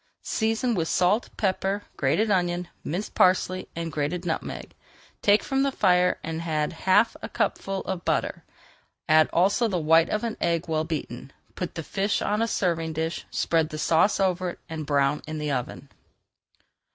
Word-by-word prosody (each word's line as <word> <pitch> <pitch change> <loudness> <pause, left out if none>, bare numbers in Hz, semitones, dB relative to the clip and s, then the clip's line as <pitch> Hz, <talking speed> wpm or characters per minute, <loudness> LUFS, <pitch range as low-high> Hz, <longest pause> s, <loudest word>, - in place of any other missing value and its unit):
Season 225 +2 0
with 165 -6 -1
salt, 185 +8 +2
pepper, 195 0 0
grated 165 +11 +1
onion, 175 -2 0 0.2
minced 185 +7 -4
parsley, 185 0 +2
and 165 0 -4
grated 155 +4 -2
nutmeg, 165 - -4 0.5
take 205 +1 +4
from 270 0 0
the 275 0 +2
fire 180 -6 +3
and 160 0 -4
add 155 -1 -1
half 190 +6 +3
a - - -6
cupful 195 -1 -1
of 185 -3 -4
butter. - - -1 0.6
Add 155 0 +5
also 200 +7 +3
the 190 -4 -1
white 165 0 +4
of 215 - -1
an 230 -2 -3
egg 170 0 0
well 160 -1 0
beaten. 140 -5 -5 0.2
Put 180 - -5
the 165 - -4
fish 200 +5 -1
on 210 +2 0
a 230 - +2
serving 165 -6 -1
dish, 160 +2 -3
spread 160 -2 +1
the 155 - -6
sauce 165 +7 +3
over 185 -1 +1
it - - -9
and 160 -2 -6
brown 140 0 +2
in 155 0 -4
the 150 -1 -2
oven. 130 +1 -4
175 Hz, 170 wpm, -26 LUFS, 160-195 Hz, 0.6 s, Add